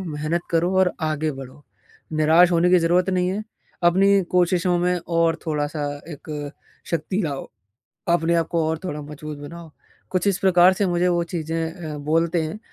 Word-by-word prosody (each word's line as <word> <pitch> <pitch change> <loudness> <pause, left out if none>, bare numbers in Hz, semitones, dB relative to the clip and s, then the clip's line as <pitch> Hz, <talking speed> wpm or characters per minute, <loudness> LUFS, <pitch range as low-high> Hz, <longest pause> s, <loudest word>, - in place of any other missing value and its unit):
मेहनत 165 0 -2
करो 170 +2 +1
और 185 -1 +3
आगे 155 -1 -1
बढ़ो, 135 +1 -11 0.5
निराश 160 +3 +5
होने 170 +1 +3
की 180 - +6
ज़रूरत 175 +3 +2
नहीं 180 -1 +1
है, 200 +3 -2 0.4
अपनी 195 +3 +4
कोशिशों 180 0 +2
में 180 +1 +1
और 165 -1 +2
थोड़ा-सा 150 -1 -2 0.3
एक 150 0 -7 0.4
शक्ति 170 +5 -1
लाओ, 140 -3 -4 0.6
अपने 170 0 +2
आप 165 -1 +1
को 165 -2 +1
और 160 0 -1
थोड़ा 150 -5 -4
मजबूत 150 0 -8
बनाओ। 160 +2 -10 0.4
कुछ 185 +1 0
इस 195 -2 +2
प्रकार 185 -1 +5
से 200 - +1
मुझे 175 0 +1
वो 175 -1 +1
चीज़ें 165 -1 -3 0.2
अ, - - -6
बोलते 165 +3 +1
हैं 160 +7 -5
170 Hz, 170 wpm, -22 LUFS, 155-180 Hz, 0.6 s, की